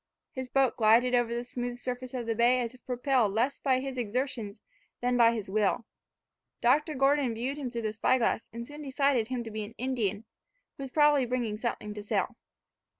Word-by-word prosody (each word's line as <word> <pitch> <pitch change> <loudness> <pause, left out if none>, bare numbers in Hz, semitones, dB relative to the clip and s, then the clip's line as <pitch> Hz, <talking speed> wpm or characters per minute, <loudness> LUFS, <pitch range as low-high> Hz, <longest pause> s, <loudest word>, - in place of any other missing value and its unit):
His 260 -1 -6
boat 270 -2 +2
glided 235 +3 +4
over 240 -1 +2
the 235 +1 -2
smooth 245 0 -4
surface 250 +1 -5
of 245 -2 -3
the 225 - 0
bay 240 +3 +4
as 235 0 -3
if 255 - -18
propelled 250 -4 +1
less 250 +5 +1
by 260 -2 +2
his 265 -1 -4
exertions 235 -2 -3 0.4
than 245 0 +1
by 235 -1 +6
his 220 -4 -4
will. 210 +3 +1 0.7
Dr. 295 +6 +2
Gordon 270 -2 +2
viewed 255 +5 -3
him 265 -3 -3
through 235 -1 -4
the 215 -1 -1
spy 225 +4 +2
glass, 230 -2 0
and 235 +1 -6
soon 295 +1 -9
decided 275 -4 +1
him 250 -1 -3
to 225 - -8
be 215 0 -4
an 215 +2 -10
Indian, 225 -5 -2 0.5
who - - -10
was 270 - -5
probably 295 -2 +4
bringing 235 -4 -2
something 220 -3 -3
to 210 - -6
sell. 205 - -1
245 Hz, 205 wpm, -29 LUFS, 225-260 Hz, 0.7 s, by